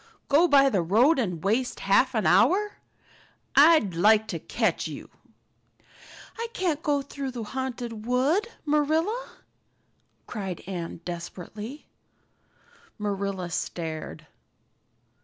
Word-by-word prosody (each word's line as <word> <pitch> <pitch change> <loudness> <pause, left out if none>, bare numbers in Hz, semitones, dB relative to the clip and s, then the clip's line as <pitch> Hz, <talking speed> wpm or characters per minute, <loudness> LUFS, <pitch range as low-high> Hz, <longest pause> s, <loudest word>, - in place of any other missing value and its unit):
"Go 310 +5 +5
by 275 -3 +6
the 205 -9 +2
road 235 - +4
and 180 -9 -2
waste 230 +6 0
half 240 +6 +3
an 220 - 0
hour! 390 - +3 0.8
I'd 290 - +6
like 215 +5 +4
to - - -3
catch - - -1
you!" - - -9 1.3
"I 465 - -2
can't 340 -9 -1
go 290 -4 0
through 275 -1 -5
the 245 -3 -5
Haunted 240 -2 -5
Wood, 280 - +2 0.2
Marilla," 315 +11 0 1.0
cried 190 -6 -5
Anne 170 -3 -6
desperately. 185 - -7 1.1
Marilla 200 -4 -3
stared. 160 -2 -5
240 Hz, 105 wpm, -26 LUFS, 195-290 Hz, 1.3 s, by